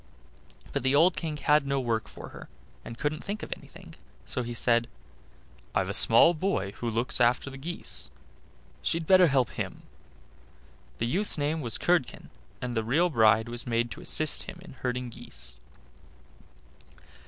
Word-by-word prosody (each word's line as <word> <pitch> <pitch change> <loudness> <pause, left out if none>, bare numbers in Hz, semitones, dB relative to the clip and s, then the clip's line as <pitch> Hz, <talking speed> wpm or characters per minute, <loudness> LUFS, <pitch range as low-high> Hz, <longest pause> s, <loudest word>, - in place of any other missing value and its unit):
But - - -1
the 130 +2 +2
old 170 +5 +5
King 155 -3 -4
had 150 -1 +2
no 140 0 0
work 115 -3 -1
for - - -11
her, - - -12 0.3
and 115 - -9
couldn't 150 +3 -2
think 205 +1 -5
of - - -4
anything; - - -15 0.3
so 125 - -3
he 120 0 -5
said, 120 0 +3 0.9
"I've - - +1
a - - -4
small 170 - +7
boy 165 - -1
who 120 - -3
looks 115 +3 0
after 120 +3 +2
the 135 - -9
geese, 170 +5 -3 0.7
she'd 165 0 -1
better 185 +1 +6
help 135 -4 +1
him." - - -6 1.1
The 115 - -1
youth's 185 - 0
name 150 +2 -1
was 120 -5 +1
Curdken, 160 -11 -1 0.3
and 125 -1 -3
the 110 - 0
real 160 +10 +2
bride 110 -2 +4
was 120 0 -6
made 120 0 0
to - - -8
assist 155 -1 +1
him - - -9
in 180 - -12
herding 125 -1 -4
geese. - - -6
130 Hz, 165 wpm, -28 LUFS, 115-155 Hz, 1.1 s, small